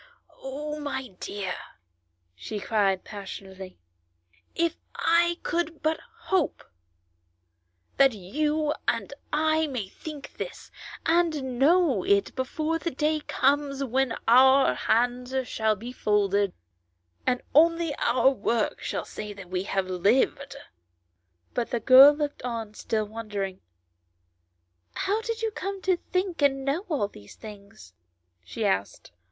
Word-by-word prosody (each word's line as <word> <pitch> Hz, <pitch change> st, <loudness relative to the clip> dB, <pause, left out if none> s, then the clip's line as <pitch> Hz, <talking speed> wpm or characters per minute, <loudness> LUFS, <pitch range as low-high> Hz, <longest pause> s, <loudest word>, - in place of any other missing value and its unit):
Oh! 300 Hz, +3 st, -5 dB
my 280 Hz, -3 st, -4 dB
dear," 195 Hz, -3 st, -4 dB, 0.8 s
she 95 Hz, -, -6 dB
cried' 200 Hz, -3 st, +1 dB
passionately, 190 Hz, -2 st, -9 dB, 0.4 s
" 90 Hz, +1 st, -38 dB
if 330 Hz, -, -2 dB, 0.2 s
I 340 Hz, +1 st, +3 dB
could 335 Hz, -2 st, -2 dB
but 315 Hz, +1 st, +1 dB, 0.3 s
hope 370 Hz, -5 st, +1 dB, 1.3 s
that 270 Hz, -1 st, +6 dB
you 295 Hz, -, -1 dB
and 230 Hz, +2 st, -1 dB, 0.2 s
I 315 Hz, +1 st, +2 dB
may 250 Hz, -8 st, -4 dB
think 300 Hz, +3 st, -9 dB
this, -, -, -7 dB, 0.3 s
and 310 Hz, -7 st, +1 dB
know 305 Hz, -, +4 dB
it 200 Hz, 0 st, +2 dB
before 310 Hz, +5 st, -1 dB
the 335 Hz, -, -2 dB
day 305 Hz, +1 st, 0 dB
comes 280 Hz, -1 st, 0 dB
when 265 Hz, -1 st, 0 dB
our 265 Hz, +3 st, +6 dB
hands 245 Hz, +2 st, 0 dB
shall 220 Hz, -1 st, +1 dB
be 230 Hz, +5 st, -8 dB
folded, 200 Hz, -4 st, +1 dB, 0.7 s
and 250 Hz, -1 st, +1 dB
only 330 Hz, +1 st, +4 dB
our 255 Hz, +2 st, +3 dB
work 230 Hz, -2 st, -1 dB
shall -, -, -3 dB
say 210 Hz, -1 st, -7 dB
that 195 Hz, -3 st, -12 dB
we 180 Hz, -1 st, 0 dB
have 195 Hz, -2 st, -1 dB
lived 205 Hz, +10 st, +1 dB, 0.5 s
" 85 Hz, 0 st, -46 dB
But 240 Hz, -1 st, -1 dB
the 240 Hz, -, -1 dB
girl 265 Hz, +5 st, +9 dB
looked 295 Hz, -1 st, -3 dB
on 230 Hz, -3 st, -4 dB
still 215 Hz, 0 st, -2 dB
wondering. 205 Hz, -3 st, -5 dB, 0.7 s
" 85 Hz, 0 st, -48 dB
How 415 Hz, +3 st, +1 dB
did 455 Hz, 0 st, -4 dB
you 445 Hz, -, 0 dB
come 395 Hz, -1 st, -4 dB
to 375 Hz, -1 st, +3 dB, 0.2 s
think 365 Hz, -3 st, -1 dB
and 270 Hz, -1 st, +2 dB
know 320 Hz, +9 st, -1 dB
all 280 Hz, -11 st, 0 dB
these 105 Hz, -, -14 dB
things 200 Hz, -, -12 dB, 0.2 s
?" 85 Hz, 0 st, -48 dB
she 85 Hz, -, -4 dB
asked. 95 Hz, -1 st, -1 dB
250 Hz, 135 wpm, -26 LUFS, 200-300 Hz, 1.3 s, girl